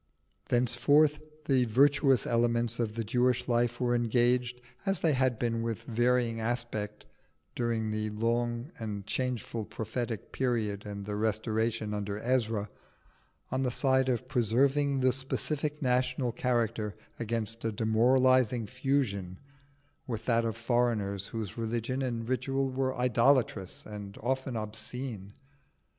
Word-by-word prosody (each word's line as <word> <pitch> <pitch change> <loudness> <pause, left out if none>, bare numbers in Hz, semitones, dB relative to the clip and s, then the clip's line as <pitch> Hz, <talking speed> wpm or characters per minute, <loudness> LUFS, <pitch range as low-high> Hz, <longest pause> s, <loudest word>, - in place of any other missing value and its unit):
Thenceforth 145 +5 +4 0.3
the 130 -3 +3
virtuous 135 +2 +4
elements 120 0 +1
of 110 -2 -1
the 115 - -2
Jewish 125 +3 +1
life 120 -1 +1
were 125 -1 +1
engaged, 120 +1 +2 0.2
as 195 -1 0
they 160 -3 +3
had 130 -3 +2
been 115 -1 -1
with 115 -2 -3
varying 120 0 +1
aspects 110 -3 -3 0.5
during 115 -2 -1
the 110 0 -2
long 120 +4 -1
and 105 -3 -4
changeful 120 -2 -2
prophetic 110 0 -4
period 110 -6 -1
and 100 -1 -6
the 105 0 -3
restoration 110 0 -1
under 105 -1 -3
Ezra, 115 -3 0 0.8
on 130 +1 0
the 130 - +1
side 130 +1 +2
of 125 0 -1
preserving 135 +3 +2
the 130 -1 +4
specific 150 +3 -1
national 125 0 +1
character 115 -4 -1 0.2
against 115 0 0
a 115 - 0
demoralising 120 +2 +3
fusion 125 -8 -1 0.7
with 115 -3 -4
that 115 -1 +2
of 115 -1 -2
foreigners 115 -5 0
whose 110 -1 -5
religion 115 +3 -2
and 120 -3 -2
ritual 135 +1 0
were 130 0 -1
idolatrous 125 -5 +2
and 105 -1 -8
often 130 0 -1
obscene. 110 -1 -5
120 Hz, 125 wpm, -30 LUFS, 110-130 Hz, 0.8 s, Thenceforth